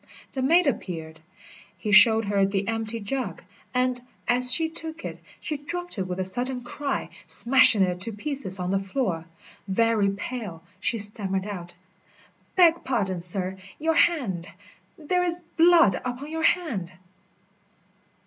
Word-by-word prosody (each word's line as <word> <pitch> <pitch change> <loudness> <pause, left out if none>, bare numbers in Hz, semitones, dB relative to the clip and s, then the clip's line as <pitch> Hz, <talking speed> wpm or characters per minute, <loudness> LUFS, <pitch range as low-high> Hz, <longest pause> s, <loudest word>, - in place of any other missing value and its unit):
The 265 - -3
maid 335 +7 +3
appeared, 165 - -4 0.6
he 210 - -4
showed 225 +2 +6
her 200 -1 +1
the 195 0 -1
empty 225 0 -3
jug, 205 -4 -4 0.3
and 250 -1 -1 0.3
as 250 +1 +6
she 325 +3 +6
took 320 0 -7
it - - -7 0.2
she 305 - -3
dropped 350 - -6
it 185 - -2
with 180 0 -5
a - - 0
sudden 245 +6 0
cry, 275 +3 -4 0.2
smashing 240 -5 +5
it 180 -1 -2
to 230 - -4
pieces 215 -3 -5
on 180 0 -3
the 195 - +1
floor. 195 -5 -3 0.4
Very 215 0 +1
pale, 200 -4 -6 0.2
she 230 - -1
stammered 200 -2 +3
out: 175 -4 -8 0.8
"Beg 340 -2 +4
pardon, 195 -8 -2
sir, 185 +2 +4 0.2
your 325 +2 0
hand 240 - +1 0.5
there 360 +4 -1
is 350 0 +1
blood 330 - +4
upon 255 +4 -6
your 320 0 -4
hand." 220 - -3
225 Hz, 145 wpm, -25 LUFS, 190-280 Hz, 0.8 s, showed